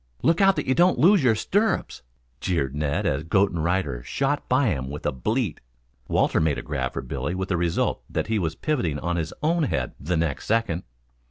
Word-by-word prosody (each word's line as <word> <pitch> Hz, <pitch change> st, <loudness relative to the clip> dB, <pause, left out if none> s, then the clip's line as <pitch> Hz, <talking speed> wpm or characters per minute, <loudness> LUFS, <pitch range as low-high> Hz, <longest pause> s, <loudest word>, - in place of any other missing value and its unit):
"Look 165 Hz, +3 st, +3 dB
out 195 Hz, 0 st, +5 dB
that -, -, -2 dB
you 130 Hz, -, +2 dB
don't 175 Hz, +5 st, +4 dB
lose 175 Hz, +5 st, +5 dB
your 120 Hz, -4 st, +4 dB
stirrups," 205 Hz, -, 0 dB, 0.4 s
jeered 70 Hz, -7 st, -1 dB
Ned 75 Hz, -1 st, -1 dB
as 70 Hz, +3 st, 0 dB
goat 95 Hz, +4 st, +2 dB
and 85 Hz, -3 st, -2 dB
rider 85 Hz, -8 st, 0 dB
shot 140 Hz, -, -2 dB
by 130 Hz, -1 st, +3 dB
him 65 Hz, -7 st, -2 dB
with 75 Hz, +1 st, -7 dB
a -, -, +2 dB
bleat. 105 Hz, -, -2 dB, 0.5 s
Walter -, -, +2 dB
made 80 Hz, -3 st, +1 dB
a -, -, -5 dB
grab 65 Hz, -4 st, -3 dB
for -, -, -4 dB
Billy 90 Hz, -, -3 dB
with 95 Hz, +1 st, -3 dB
the 90 Hz, -, +1 dB
result 85 Hz, -1 st, 0 dB
that -, -, -1 dB
he 110 Hz, -1 st, 0 dB
was 80 Hz, -3 st, -2 dB
pivoting 90 Hz, -, -1 dB
on 85 Hz, +3 st, -2 dB
his 80 Hz, -2 st, -2 dB
own 165 Hz, +2 st, +2 dB
head 65 Hz, -, -2 dB
the 85 Hz, +4 st, -1 dB
next 80 Hz, -4 st, -2 dB
second. 110 Hz, -6 st, 0 dB
90 Hz, 210 wpm, -25 LUFS, -, 0.5 s, out